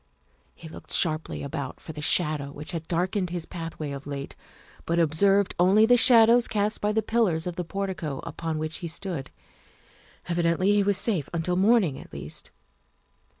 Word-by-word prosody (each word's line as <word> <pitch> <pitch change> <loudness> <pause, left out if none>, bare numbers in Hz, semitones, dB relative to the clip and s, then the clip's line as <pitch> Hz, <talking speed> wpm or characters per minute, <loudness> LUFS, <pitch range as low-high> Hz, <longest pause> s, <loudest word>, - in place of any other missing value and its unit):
He 165 - -12
looked 160 - -12
sharply 155 -1 +1
about 140 -1 -5
for 160 - -9
the 150 - -8
shadow 150 -3 0
which 150 +4 -6
had 165 -2 -6
darkened 180 +2 -1
his 175 -2 -4
pathway 165 -4 -6
of 140 0 -8
late, 140 -1 -6 0.5
but 170 - 0
observed 195 +5 +3
only 195 +5 +5
the 245 +2 +5
shadows 235 0 +7
cast 210 0 -1
by 210 - +1
the 220 +1 0
pillars 210 -8 +1
of 180 -1 -4
the 180 - -3
portico 185 -6 -4
upon 165 -2 -4
which 155 0 -4
he 170 - -6
stood. 165 -4 -5 1.0
Evidently 170 +2 +1
he 205 - +3
was 200 -1 +2
safe 190 - 0
until 170 +2 -1
morning 195 - +2
at - - -13
least. - - -6
175 Hz, 170 wpm, -26 LUFS, 155-200 Hz, 1.0 s, shadows